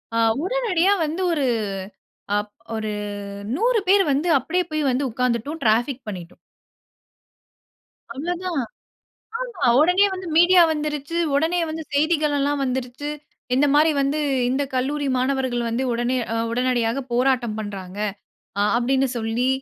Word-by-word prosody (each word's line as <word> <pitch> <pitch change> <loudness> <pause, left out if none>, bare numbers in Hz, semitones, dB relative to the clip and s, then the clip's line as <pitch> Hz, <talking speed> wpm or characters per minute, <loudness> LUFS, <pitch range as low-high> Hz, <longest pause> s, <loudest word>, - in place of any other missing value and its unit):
அ - - +1 0.3
உடனடியா 400 -5 +2
வந்து 320 +5 -3
ஒரு 290 -4 0 0.9
அப் 205 0 -3 0.2
ஒரு 215 -1 -3 0.6
100 465 +4 +2
பேரு 395 0 +5
வந்து, 290 +6 0
அப்டியே 360 +2 -1
போய் 310 0 0
வந்து 255 +3 0
உட்கார்ந்துட்டோம் 250 +6 -1
டிராபிக் 240 +4 +1
பண்ணிட்டோம். 180 -4 -7 1.8
அவ்ளோ 310 +8 -2
தான். 365 -2 -2 0.9
ஆமா. 470 - -2
ஒடனே 360 +6 +5
வந்து 370 -1 -6
மீடியா 355 +1 +7
வந்துருச்சு. 300 +1 -3 0.2
ஒடனே 325 +5 +2
வந்து 320 0 -5
செய்திகளல்லாம் 290 -2 +1
வந்துருச்சு. 260 +2 -3 0.5
இந்த 275 +3 +4
மாரி 310 +2 +5
வந்து 280 +2 0 0.3
இந்த 265 +3 +1
கல்லூரி 280 +3 -1
மாணவர்கள் 260 -1 0
வந்து 235 +3 -1
உடனே 240 +2 0 0.2
அ - - -1 0.2
உடனடியாக 245 0 0
போராட்டம் 245 -3 +1
பண்றாங்க. 195 -3 -7 0.6
அ - - +3
அப்டின்னு 265 +3 +2
சொல்லி 225 +3 0
275 Hz, 125 wpm, -22 LUFS, 245-320 Hz, 1.8 s, மீடியா